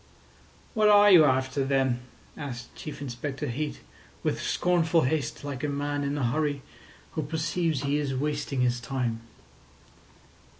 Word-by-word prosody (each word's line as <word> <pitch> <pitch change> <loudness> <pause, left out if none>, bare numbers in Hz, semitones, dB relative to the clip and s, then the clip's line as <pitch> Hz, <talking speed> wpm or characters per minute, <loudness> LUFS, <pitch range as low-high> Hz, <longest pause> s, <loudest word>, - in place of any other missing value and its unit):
"What 215 -2 +4
are 205 0 +7
you 165 -5 +9
after, 130 0 +1
then?" 135 -2 +1 0.4
asked 120 -4 -7
Chief 150 -2 -8
Inspector 135 +1 -4
Heat, 145 +5 -3 0.4
with - - -1
scornful 170 -2 +2
haste, 150 +1 -1
like 140 -1 -5
a 150 - 0
man 145 0 -2
in 140 +1 -1
a 140 - -1
hurry 145 +2 0 0.5
who 160 - -2
perceives 155 0 -1
he 140 +1 +1
is 140 -3 -2
wasting 145 -1 -1
his 125 -1 +2
time. 120 -3 -2
145 Hz, 140 wpm, -27 LUFS, 130-155 Hz, 0.5 s, you